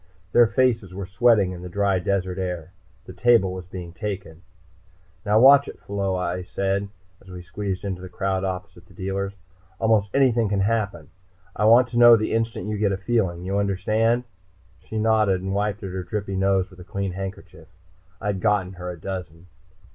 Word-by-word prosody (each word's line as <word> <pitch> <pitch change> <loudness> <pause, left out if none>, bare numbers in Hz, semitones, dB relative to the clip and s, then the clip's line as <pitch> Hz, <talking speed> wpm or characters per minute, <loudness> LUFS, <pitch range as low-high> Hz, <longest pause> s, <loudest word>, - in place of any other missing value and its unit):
Their 120 +2 +6
faces 110 -4 +1
were 100 0 -5
sweating 100 0 +3
in 90 -1 -8
the 90 - -7
dry 100 0 +1
desert 95 0 -1
air. 90 -2 -4 0.3
The - - -10
table 115 -6 +3
was 90 -1 -8
being 90 -2 -8
taken. 90 -3 -6 0.8
"Now 105 0 +3
watch 140 +3 +7
it, - - -9
Pheola," 100 -2 -2
I 90 0 -2
said, 100 +2 -2 0.3
as 95 - -17
we 90 -1 -9
squeezed 100 0 -4
into 95 -2 -4
the 95 - -8
crowd, 95 0 -2
opposite 95 -1 -5
the - - -19
dealers. 95 +1 -3 0.4
"Almost 110 -3 +2
anything 120 -5 +3
can 100 -1 0
happen. 100 -6 -1 0.5
I 105 - 0
want 120 +3 +6
to 120 - -1
know 120 -1 +9
the 110 -1 -1
instant 115 -4 -1
you 105 -1 -3
get 100 -2 +2
a 95 - -1
feeling. 95 -5 -1
You 100 +2 -1
understand?" 110 +5 +1 0.6
She 110 - -7
nodded 110 -4 +2
and 95 0 -3
wiped 105 +1 -1
at 95 - -5
her 95 0 -4
drippy 100 +2 -4
nose 95 0 +1
with 95 - -16
a - - -9
clean 100 0 -3
handkerchief. 95 -3 -8 0.5
I'd 100 -2 -2
gotten 100 -4 +1
her 90 0 -7
a 90 - -6
dozen. 90 -2 -7
100 Hz, 185 wpm, -24 LUFS, 95-110 Hz, 0.8 s, know